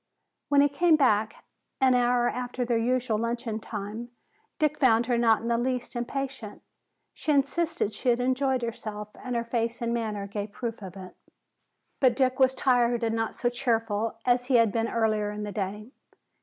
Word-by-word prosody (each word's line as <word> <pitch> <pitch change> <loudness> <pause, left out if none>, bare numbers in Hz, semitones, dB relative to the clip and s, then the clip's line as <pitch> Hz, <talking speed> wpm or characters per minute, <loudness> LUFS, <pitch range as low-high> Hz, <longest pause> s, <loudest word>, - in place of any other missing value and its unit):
When 285 -1 +5
he 285 - +5
came 325 +3 +4
back 220 -7 +1 0.3
an 260 -2 +4
hour 245 0 +3
after 250 0 -3
their 240 0 0
usual 240 -2 0
luncheon 230 -1 -2
time, 215 +2 -6 0.5
Dick 300 -1 0
found 235 -4 +4
her 245 0 +1
not 225 -2 +3
in - - -3
the 235 0 +1
least 250 0 -2
impatient. 255 -2 -5 0.5
She 310 - -2
insisted 300 0 +1
that - - -16
she 245 - -1
had 240 0 +3
enjoyed 260 0 +1
herself, 215 -2 -5
and 250 -1 -3
her 235 - 0
face 235 0 -2
and 235 -1 -1
manner 215 -4 -2
gave 205 +1 -5
proof 230 0 -5
of 190 -1 -9
it. 185 -1 -10 0.8
But 255 -3 +4
Dick 260 0 +1
was 260 0 +4
tired 240 -2 +2
and 225 0 0
not 225 0 -2
so 240 - -1
cheerful 225 -3 -1
as 245 0 +2
he 260 0 +1
had 230 -3 +5
been 225 +2 0
earlier 215 -2 +1
in 210 0 -5
the 205 - -4
day. 210 +4 -4
235 Hz, 185 wpm, -27 LUFS, 220-255 Hz, 0.8 s, When